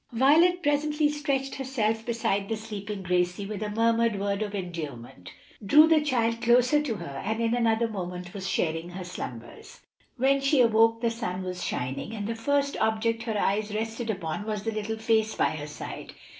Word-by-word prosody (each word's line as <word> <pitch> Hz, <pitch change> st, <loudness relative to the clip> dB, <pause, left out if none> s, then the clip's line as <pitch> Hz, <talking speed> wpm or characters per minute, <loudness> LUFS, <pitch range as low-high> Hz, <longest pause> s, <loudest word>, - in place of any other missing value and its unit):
Violet 325 Hz, +9 st, +4 dB
presently 295 Hz, +1 st, +2 dB
stretched 280 Hz, -2 st, -1 dB
herself 225 Hz, -5 st, -1 dB
beside 220 Hz, -4 st, -1 dB
the 225 Hz, -, -1 dB
sleeping 210 Hz, -2 st, -6 dB
Gracie 180 Hz, +2 st, 0 dB
with 210 Hz, 0 st, -5 dB
a 210 Hz, -, -2 dB
murmured 230 Hz, 0 st, +2 dB
word 200 Hz, +1 st, -1 dB
of 205 Hz, -1 st, -3 dB
endearment 150 Hz, -, -6 dB, 0.3 s
drew 295 Hz, +10 st, +7 dB
the 320 Hz, -1 st, +4 dB
child 230 Hz, -5 st, 0 dB
closer 245 Hz, +5 st, +4 dB
to 265 Hz, -7 st, -2 dB
her, 140 Hz, -8 st, -6 dB
and 220 Hz, +2 st, -2 dB
in 230 Hz, 0 st, +1 dB
another 230 Hz, -1 st, +2 dB
moment 180 Hz, -4 st, -6 dB
was 195 Hz, -1 st, -4 dB
sharing 165 Hz, +1 st, -1 dB
her 185 Hz, +1 st, -7 dB
slumbers. 120 Hz, -9 st, -8 dB, 0.4 s
When 275 Hz, +2 st, +3 dB
she 275 Hz, 0 st, +3 dB
awoke 225 Hz, -1 st, +4 dB
the 235 Hz, -1 st, +1 dB
sun 190 Hz, -5 st, -4 dB
was 180 Hz, -1 st, -5 dB
shining, 130 Hz, -, -3 dB
and 205 Hz, -2 st, -4 dB
the 230 Hz, -, -2 dB
first 280 Hz, +5 st, 0 dB
object 225 Hz, +1 st, 0 dB
her 220 Hz, -3 st, -1 dB
eyes 210 Hz, +2 st, 0 dB
rested 225 Hz, +2 st, -3 dB
upon 195 Hz, 0 st, -3 dB
was 210 Hz, -2 st, -3 dB
the 225 Hz, -, -1 dB
little 215 Hz, +1 st, -3 dB
face 220 Hz, -1 st, +1 dB
by -, -, +2 dB
her 150 Hz, -1 st, -6 dB
side. 150 Hz, -, -8 dB
220 Hz, 185 wpm, -27 LUFS, 195-240 Hz, 0.4 s, drew